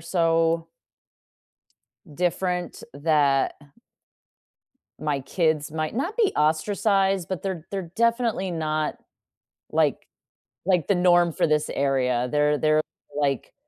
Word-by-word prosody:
so 165 -1 +1 1.4
different 180 +2 -2
that 145 -2 +2 1.4
my 150 -2 -1
kids 155 +1 0
might 155 +2 -3
not 310 - -2
be 450 -5 +2
ostracized, 195 +3 +1
but 185 -4 -4
they're 185 -5 -4
they're 190 -4 -4
definitely 230 -4 +1
not, 155 -2 -1 0.8
like - - +1 0.6
like 180 -4 +2
the 200 - +3
norm 175 -1 +4
for - - +1
this 150 0 +1
area. 125 -3 0
They're 150 0 +2
they're, 155 +1 +3 0.4
like 140 -3 -1
165 Hz, 105 wpm, -24 LUFS, 150-185 Hz, 1.4 s, norm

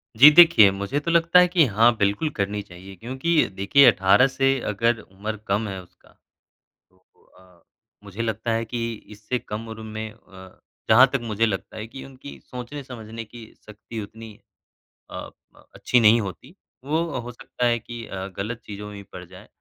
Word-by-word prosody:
जी, 135 +7 +10
देखिए, 155 - +8
मुझे 100 +9 -3
तो 170 +3 -3
लगता 170 +1 +5
है 180 - +5
कि 175 -3 +3
हाँ, 115 +1 +3
बिल्कुल 100 +9 0
करनी 100 +1 -2
चाहिए 95 0 -13
क्योंकि 130 - 0
देखिए 115 +9 +4
18 100 +6 +4
से 135 0 +1
अगर 115 +2 0
उम्र 105 +3 -7
कम 105 +3 0
है 95 -2 -6
उसका, 90 - -23 0.8
तो 95 - -32 0.4
अ, 90 -2 -23 0.4
मुझे 100 +2 -7
लगता 110 0 -2
है 115 0 -1
कि 115 0 -4 0.2
इससे 110 +4 -4
कम 110 +1 -7
उम्र 110 0 -8
में 110 0 -6
अ, 95 -2 -16 0.3
जहाँ 120 +4 +7
तक 135 - +1
मुझे 110 0 0
लगता 95 -4 -4
है 110 +1 -6
कि 135 +3 -10
उनकी 135 +1 -12
सोचने-समझने 125 -3 -8
की 115 +1 -12 0.2
शक्ति 110 +1 -9
उतनी 110 +1 -11 0.8
अ - - -8 0.4
अ, - - -21
अच्छी 125 - +2
नहीं 115 +1 +5
होती, 115 - -9 0.3
वो 155 +4 0 0.2
हो 120 0 -7
सकता 120 +1 -5
है 120 -1 +2
कि 115 0 -9
अ, 95 0 -6
गलत 115 +4 -5
चीज़ों 105 0 -8
में 105 - -10
भी 100 - -10
पड़ 90 -2 -11
जाएँ। 90 +3 -15
110 Hz, 180 wpm, -23 LUFS, 100-125 Hz, 0.8 s, जी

